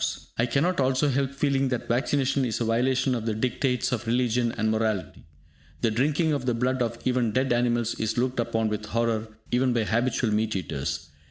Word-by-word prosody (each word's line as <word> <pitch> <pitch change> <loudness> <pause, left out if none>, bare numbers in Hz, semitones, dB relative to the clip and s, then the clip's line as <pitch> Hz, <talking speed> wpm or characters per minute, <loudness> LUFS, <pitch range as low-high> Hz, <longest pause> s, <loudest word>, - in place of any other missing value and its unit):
I 115 - +1
cannot 150 +8 +1
also 135 +2 +2
help 135 0 +1
feeling 140 -1 0
that 125 -2 -2
vaccination 135 +2 +1
is 120 -4 -1
a 120 - 0
violation 125 +3 +2
of 115 -2 -3
the 110 - 0
dictates 125 +2 0
of 120 -1 -2
religion 120 0 +1
and 110 0 0
morality. 110 -6 -2 0.6
The 115 - +2
drinking 150 +7 +1
of 140 -3 -2
the 120 - +2
blood 125 +2 0
of 115 -1 -1
even 125 -4 +1
dead 130 0 +2
animals 120 -1 +1
is 110 +1 -1
looked 125 +1 0
upon 115 -1 0
with 105 0 -4
horror 115 0 0 0.2
even 125 +1 +2
by 115 -2 +1
habitual 115 +1 0
meat 110 0 0
eaters. 80 -1 -4
120 Hz, 190 wpm, -26 LUFS, 110-130 Hz, 0.6 s, also